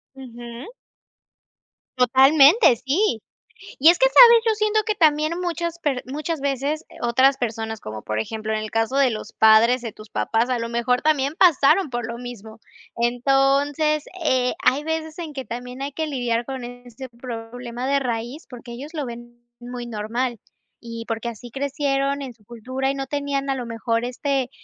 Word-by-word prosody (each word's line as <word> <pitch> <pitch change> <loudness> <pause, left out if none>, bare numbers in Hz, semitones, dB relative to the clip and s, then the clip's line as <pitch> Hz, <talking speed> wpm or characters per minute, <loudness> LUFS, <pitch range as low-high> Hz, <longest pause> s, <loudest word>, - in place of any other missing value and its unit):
Ujú. 240 - -10 1.2
Totalmente, 275 - +6
sí, 275 - 0 0.6
y 310 +5 +7
es 345 - +4
que, - - +6
¿sabes?, 470 -2 +8
yo 445 -1 +2
siento 430 0 +1
que 430 0 -1
también 310 -1 +2
muchas 340 -1 -3
per 280 -6 -1
muchas 300 +3 -4
veces, 280 +3 -2
eh, - - -16
otras 260 +3 +3
personas, 225 -2 -4
como 110 0 -7
por 110 0 -2
ejemplo, 220 - -4
en 215 - 0
el 215 0 -6
caso 225 +3 0
de 270 -3 +4
los 215 - -6
padres 225 +3 +5
de 230 - -5
tus 215 0 -14
papás, 230 +4 0
a 250 - +1
lo 230 0 -4
mejor 235 +1 0
también 295 -1 +1
pasaron 320 0 +4
por 240 -1 -3
lo 235 0 -6
mismo. 225 -3 -10 0.4
Entonces, 275 +5 +1 0.2
eh, 255 -3 +2
hay 280 -1 +3
veces 320 0 -4
en 320 -3 -6
que 265 -2 -6
también 250 +2 -7
hay 280 - -4
que 315 +1 -3
lidiar 240 -4 -1
con 265 -1 -6
este 245 +1 -10
otro 235 -2 -16 0.3
problema 245 +1 -6
de 280 0 +2
raíz 240 +4 -4
porque 245 -1 -10
ellos 285 +7 -9
lo 300 -3 -3
ven 240 0 -10 0.2
muy 245 0 -7
normal 235 +2 -3 0.4
y 230 -1 -7
porque 225 +1 -3
así 235 +1 -10
crecieron 275 +1 -1
en 265 -3 -7
su 220 -2 -29
cultura 255 +4 -4
y - - -5
no 270 0 -4
tenían 280 -1 -2
a 270 - +1
lo 250 -2 -5
mejor 230 0 -2
este, 255 +1 -2
255 Hz, 180 wpm, -22 LUFS, 235-290 Hz, 1.2 s, sabes